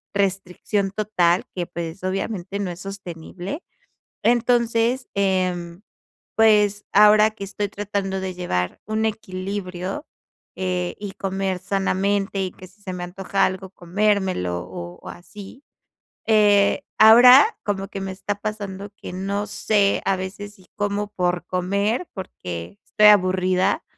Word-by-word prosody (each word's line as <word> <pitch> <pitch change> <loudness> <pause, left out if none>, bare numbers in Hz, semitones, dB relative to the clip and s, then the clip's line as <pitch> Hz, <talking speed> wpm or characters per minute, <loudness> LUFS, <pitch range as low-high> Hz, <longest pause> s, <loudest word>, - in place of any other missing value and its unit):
restricción 195 +1 -1
total 190 -4 +1
que, 175 -1 -2
pues, 170 +2 -6
obviamente, 195 0 -3
no 185 -3 -2
es 175 - -9
sostenible. 190 - -7 0.6
Entonces, 235 +1 +2
em, 185 -3 -1 0.6
pues, 210 -2 +4
ahora 210 +1 +6
que 200 -2 -7
estoy 205 +1 -3
tratando 195 -1 -3
de 190 -1 -4
llevar 90 - -2
un 220 +1 0
equilibrio, 190 - -4 0.5
eh, 180 -1 -2
y 205 -2 -5
comer 190 -1 -2
sanamente, 195 +1 0
y 185 - -2
que 185 - -13
si 205 +2 -26
se 185 -3 -5
me 175 0 -5
antoja 195 +2 -1
algo 190 0 -5
comérmelo 185 - 0
o 85 0 -8
o - - -9
así. 205 +8 -12 0.6
Eh, 205 -2 +4
ahora 250 - +8
como 195 -1 -2
que 195 - -6
me 190 0 -4
está 195 +2 -4
pasando 200 -2 -5
que, - - -9
no 200 +2 -2
sé, 205 -1 +1
a 195 - +3
veces 205 +2 -7
si 185 -1 -21
como 205 0 -1
por 175 -1 -1
comer, 200 - -1
porque 90 - -7
estoy 210 - +3
aburrida, 185 -1 +3
195 Hz, 135 wpm, -22 LUFS, 185-210 Hz, 0.6 s, ahora